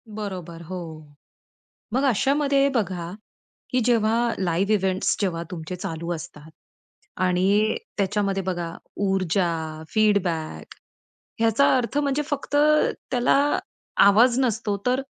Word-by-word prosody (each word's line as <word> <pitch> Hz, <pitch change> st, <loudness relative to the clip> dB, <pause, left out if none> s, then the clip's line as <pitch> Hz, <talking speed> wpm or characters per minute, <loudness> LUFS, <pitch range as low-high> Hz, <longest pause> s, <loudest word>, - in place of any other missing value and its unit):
बरोबर 180 Hz, -5 st, -6 dB
हो. 185 Hz, +3 st, -6 dB, 1.2 s
मग 260 Hz, +3 st, +1 dB
अशामध्ये 275 Hz, +2 st, +2 dB
बघा, 185 Hz, -6 st, -2 dB, 0.6 s
की 255 Hz, -, +1 dB
जेव्हा 230 Hz, 0 st, +2 dB
लाईव्ह 190 Hz, +3 st, +1 dB
इव्हेंट्स 190 Hz, -2 st, +1 dB
जेव्हा 170 Hz, -4 st, -1 dB
तुमचे 170 Hz, 0 st, -5 dB
चालू 170 Hz, -1 st, -5 dB
असतात 155 Hz, -2 st, -9 dB, 0.8 s
आणि 200 Hz, +4 st, +2 dB, 0.2 s
त्याच्यामध्ये 195 Hz, -1 st, 0 dB
बघा, 175 Hz, -2 st, -3 dB, 0.3 s
ऊर्जा, 170 Hz, -4 st, -1 dB
फीडबॅक 195 Hz, -7 st, 0 dB, 0.7 s
याचा 225 Hz, +6 st, +4 dB
अर्थ 250 Hz, +3 st, -2 dB
म्हणजे 285 Hz, 0 st, +1 dB
फक्त 290 Hz, 0 st, -3 dB, 0.6 s
त्याला 245 Hz, -1 st, +3 dB, 0.7 s
आवाज 235 Hz, +5 st, +5 dB
नसतो, 225 Hz, -5 st, 0 dB
तर 255 Hz, +2 st, +2 dB
200 Hz, 105 wpm, -24 LUFS, 175-235 Hz, 1.2 s, आवाज